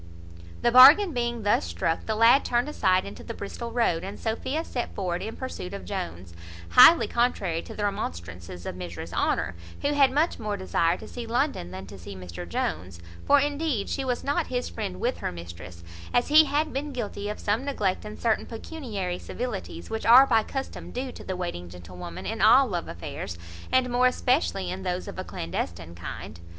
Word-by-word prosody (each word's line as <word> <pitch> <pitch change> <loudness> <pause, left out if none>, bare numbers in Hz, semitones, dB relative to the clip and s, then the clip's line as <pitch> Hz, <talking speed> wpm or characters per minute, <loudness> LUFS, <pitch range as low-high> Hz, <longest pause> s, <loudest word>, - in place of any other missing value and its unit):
The 240 - +4
bargain 295 - +9
being 240 -2 -2
thus 205 - +3
struck, 85 - -2
the 220 - 0
lad 230 +5 +6
turned 240 +2 +1
aside 185 -10 +2
into 200 - -9
the 230 - -7
Bristol 235 +4 -6
road, 230 -9 +1
and 195 - -7
Sophia 260 +7 -2
set 245 -7 -4
forward 180 -2 -2
in 220 +2 -5
pursuit 200 -7 -6
of 200 - -8
Jones, 95 - -5 0.4
highly 325 - +8
contrary 200 -9 0
to - - -10
the 210 - -3
remonstrances 90 - -5
of - - -4
Mrs 85 -2 -7
Honour, - - 0 0.3
who 285 - +2
had 280 -2 +5
much 305 +5 +1
more 210 -2 -3
desire 175 -2 +1
to - - -10
see 240 -2 -7
London 240 - -1
than 95 +1 -8
to 100 0 -11
see 95 +3 -9
Mr 90 -1 -8
Jones: 85 +2 -3 0.3
for 285 - +6
indeed 285 -6 -1
she 270 - -2
was 250 -2 -2
not 285 +1 0
his 250 -1 -2
friend 200 -5 -5
with 245 +2 -1
her - - -3
mistress, 85 0 -10 0.3
as 245 - +2
he 310 +1 +8
had 300 +2 0
been 285 +2 -3
guilty 205 -4 -4
of 210 - -4
some 210 +5 0
neglect 210 -10 -1
in 210 0 -8
certain 225 -2 0
pecuniary 220 - -5
civilities, 225 -8 -6
which 220 -1 -3
are 250 +4 +9
by 225 -4 +3
custom 270 +4 -6
due 255 +1 -4
to - - -11
the 185 - -4
waiting 130 - -5
gentlewoman 90 +1 -9
in - - -3
all 250 +5 +7
love 180 -8 -3
affairs, 85 0 -6 0.3
and 260 -1 +3
more 250 +1 +4
especially 250 - +1
in 185 +1 -5
those 180 -1 -3
of - - -7
a - - -2
clandestine 85 - -5
kind. 85 -1 -8
205 Hz, 195 wpm, -26 LUFS, -, 0.4 s, bargain